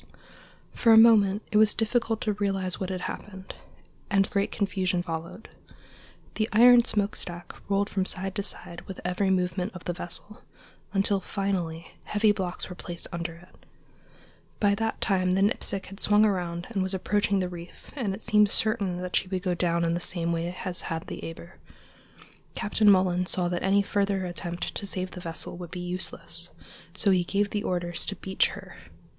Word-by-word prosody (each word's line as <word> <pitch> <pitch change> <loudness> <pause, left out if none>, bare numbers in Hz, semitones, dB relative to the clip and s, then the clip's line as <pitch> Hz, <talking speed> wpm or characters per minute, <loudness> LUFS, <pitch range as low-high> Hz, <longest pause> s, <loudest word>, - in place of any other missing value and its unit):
For 230 - +3
a 220 - +9
moment 215 -3 +6
it 210 - +3
was 215 -1 +5
difficult 225 0 0
to 210 - 0
realize 195 -3 -1
what 190 - -3
had 185 -1 -3
happened, 190 0 -7 0.6
and 195 -1 +3
great 200 0 0
confusion 190 -3 0
followed. 170 +4 -6 0.9
The 215 0 -1
iron 240 +2 +7
smokestack 195 -5 -2 0.2
rolled 200 0 +2
from 190 -3 -1
side 190 0 -1
to 200 - -2
side 175 -3 -3
with 190 - -7
every 180 +2 +1
movement 185 +1 0
of 180 - -8
the 175 - -2
vessel, 190 +6 -7 0.5
until 200 0 +1
finally 180 -4 -3
heavy 210 0 +3
blocks 185 -3 -3
were 180 - -7
placed 175 -1 -5
under 170 -1 -4
it. 175 +2 -18 1.0
By 205 -1 +3
that 225 +2 -2
time 185 -2 +2
the 195 +1 +3
Nipsic 200 -2 0
had 195 +1 -11
swung 210 +1 +4
around 175 -4 -1
and 200 -4 -1
was 190 +1 0
approaching 205 +1 +1
the 185 -1 0
reef, 175 -1 -11
and 215 -9 -1
it 220 - -11
seemed 210 -2 +4
certain 200 -5 +1
that 180 - -3
she - - +1
would 185 0 -3
go 180 -3 +1
down 170 -1 +1
in 165 - +1
the 170 - -1
same 170 -1 0
way 170 +2 -2
as 180 -2 -1
had 165 0 -4
the - - -7
Eber. 170 +2 -9 1.0
Captain 210 0 +3
Mullan 185 -2 +3
saw 180 -1 +2
that 175 0 -2
any 200 +1 +3
further 200 -2 0
attempt 175 0 -4
to 200 - -4
save 185 -1 -3
the 180 - -8
vessel 165 +1 -5
would 175 -1 -8
be 180 - -6
useless, 175 -1 -6 0.5
so 200 +1 +2
he 185 -2 +3
gave 200 +3 0
the 210 - -1
orders 175 -3 -2
to 200 - -2
beach 190 -1 +1
her. - - -10
190 Hz, 185 wpm, -27 LUFS, 175-205 Hz, 1.0 s, a